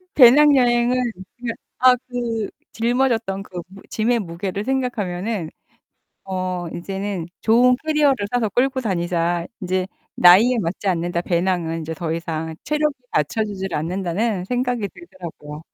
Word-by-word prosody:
배낭여행은 250 Hz, -2 st, +6 dB, 0.2 s
그 230 Hz, +6 st, -7 dB, 0.3 s
아 255 Hz, -1 st, +8 dB
그 230 Hz, -3 st, -2 dB, 0.2 s
짊어졌던 230 Hz, -4 st, 0 dB
그 180 Hz, -3 st, -7 dB
무 195 Hz, +1 st, -14 dB
짐의 235 Hz, +2 st, +1 dB
무게를 190 Hz, +2 st, -4 dB
생각하면은 215 Hz, -8 st, -2 dB, 0.8 s
어 185 Hz, -2 st, -3 dB
'이제는 195 Hz, -1 st, -4 dB
좋은 245 Hz, +3 st, +5 dB
캐리어를 290 Hz, -8 st, +2 dB
사서 235 Hz, -4 st, +1 dB
끌고 260 Hz, +3 st, +1 dB
다니자. 175 Hz, -4 st, 0 dB, 0.2 s
인제 185 Hz, 0 st, 0 dB, 0.3 s
나이에 210 Hz, +8 st, +7 dB
맞지 185 Hz, +2 st, -3 dB
않는다. 175 Hz, -1 st, 0 dB
배낭은 170 Hz, -2 st, 0 dB
인제 160 Hz, 0 st, -5 dB
더 160 Hz, 0 st, -4 dB
이상 160 Hz, -1 st, -4 dB
체력이 300 Hz, -1 st, 0 dB, 0.2 s
받쳐주지를 195 Hz, +3 st, -1 dB
않는다.'는 185 Hz, +4 st, -1 dB
생각이 245 Hz, -2 st, -1 dB
들더라고요. 170 Hz, -5 st, -10 dB
195 Hz, 300 characters per minute, -21 LUFS, 175-240 Hz, 0.8 s, 아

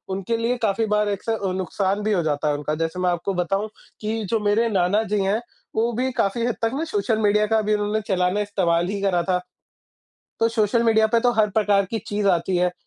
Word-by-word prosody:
उनके 195 Hz, +4 st, -2 dB
लिए 235 Hz, +2 st, 0 dB
काफ़ी 220 Hz, +2 st, +1 dB
बार 210 Hz, 0 st, +1 dB
एक 200 Hz, -1 st, -3 dB
स 225 Hz, -, +1 dB, 0.2 s
नुकसान 190 Hz, +2 st, -1 dB
भी 215 Hz, -, 0 dB
हो 175 Hz, -, +2 dB
जाता 150 Hz, -1 st, -1 dB
है 145 Hz, -, +1 dB
उनका। 150 Hz, +1 st, -3 dB
जैसे 165 Hz, +3 st, -2 dB
मैं 180 Hz, -, +1 dB
आपको 175 Hz, +3 st, -1 dB
बताऊँ 195 Hz, +4 st, -1 dB, 0.3 s
कि 220 Hz, +1 st, -2 dB
जो 225 Hz, -, +2 dB
मेरे 210 Hz, +3 st, +2 dB
नाना 195 Hz, +1 st, +2 dB
जी 205 Hz, -, +2 dB
हैं 200 Hz, +3 st, +1 dB, 0.4 s
वो 230 Hz, +2 st, +1 dB
भी 255 Hz, +3 st, -1 dB
काफ़ी 230 Hz, +4 st, 0 dB
हद 245 Hz, -, -1 dB
तक 225 Hz, 0 st, +1 dB
ना 290 Hz, +4 st, -2 dB
सोशल 215 Hz, -5 st, 0 dB
मीडिया 210 Hz, 0 st, +3 dB
का 220 Hz, -, +4 dB
भी 215 Hz, 0 st, 0 dB
उन्होंने 210 Hz, +1 st, 0 dB
चलाना 180 Hz, +1 st, +1 dB
इस्तेमाल 175 Hz, -4 st, 0 dB
ही 200 Hz, +1 st, -3 dB
करा 190 Hz, -3 st, +2 dB
था। 180 Hz, +1 st, 0 dB, 1.0 s
तो 230 Hz, -, +4 dB
सोशल 230 Hz, +1 st, +1 dB
मीडिया 220 Hz, -1 st, +4 dB
पे 230 Hz, +1 st, +2 dB
तो 245 Hz, 0 st, +3 dB
हर 215 Hz, -2 st, +2 dB
प्रकार 200 Hz, -1 st, +2 dB
की 225 Hz, +3 st, -3 dB
चीज़ 205 Hz, 0 st, -1 dB
आती 180 Hz, 0 st, +1 dB
है। 180 Hz, 0 st, +2 dB
205 Hz, 230 wpm, -23 LUFS, 185-220 Hz, 1.0 s, का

